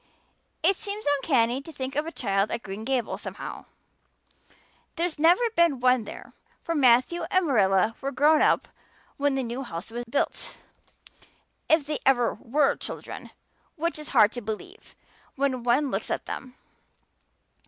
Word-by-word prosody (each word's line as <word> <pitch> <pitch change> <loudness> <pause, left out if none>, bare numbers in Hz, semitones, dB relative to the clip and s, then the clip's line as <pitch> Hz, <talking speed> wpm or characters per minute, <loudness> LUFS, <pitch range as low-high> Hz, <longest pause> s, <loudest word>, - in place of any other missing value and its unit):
It 380 +4 +4
seems 410 +2 -6
uncanny 260 -3 +1
to 325 - -10
think 265 -2 -5
of 300 +2 0
a - - -4
child 200 -7 0
at 230 - -4
Green 195 +2 -6
Gables 250 -2 -1
somehow; - - -7 1.3
there's 340 -3 -2
never 350 +9 +5
been 335 -6 +3
one 250 -2 +3
there, - - -10 0.3
for 335 - -2
Matthew 260 +4 +4
and 370 -1 +2
Marilla 205 - +3
were 275 0 -2
grown 300 +3 +4
up - - +3 0.5
when 285 -1 +1
the 265 - 0
new 240 +2 -4
house 180 -5 -7
was 240 +1 -4
built 240 +4 -2 1.1
if 315 -2 +4
they 300 0 -2
ever 245 -3 +3
were 275 +6 +1
children, - - -8 0.5
which 335 -1 -2
is 300 - -6
hard 210 - +5
to 245 - -5
believe 240 - -8 0.4
when 265 -2 0
one 250 +4 +2
looks - - -2
at - - -2
them. 255 -2 -7
270 Hz, 155 wpm, -26 LUFS, 235-310 Hz, 1.3 s, never